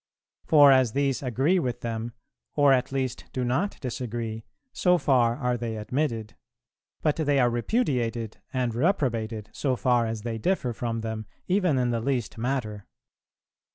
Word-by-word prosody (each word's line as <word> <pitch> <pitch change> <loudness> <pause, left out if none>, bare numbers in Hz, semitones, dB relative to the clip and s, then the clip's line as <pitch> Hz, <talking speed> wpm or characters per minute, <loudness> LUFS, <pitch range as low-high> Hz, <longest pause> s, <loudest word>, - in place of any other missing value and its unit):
For 145 -3 +7
as 130 -4 +4
these 140 -2 0
agree 135 - +2
with 125 -5 -3
them, 115 0 -4 0.4
or 145 -2 +5
at 125 0 +1
least 130 -2 -2
do 130 - -1
not 135 +12 -1
disagree, 115 -3 -4 0.3
so 180 -1 +3
far 125 -7 +3
are 125 -3 -1
they 115 -2 -4
admitted; 115 -1 -2 0.7
but 150 0 +2
they 145 -3 +2
are 120 -2 +3
repudiated 120 - -1
and 125 -3 -1
reprobated 115 - -1
so 135 -3 0
far 120 -2 +2
as 110 -2 -4
they 115 -1 -3
differ 130 - 0
from 115 0 -3
them 110 -1 -5 0.2
even 180 -6 +2
in 125 -1 +1
the 115 -1 -1
least 125 -3 -2
matter." 115 -5 -3
125 Hz, 155 wpm, -26 LUFS, 115-140 Hz, 0.7 s, For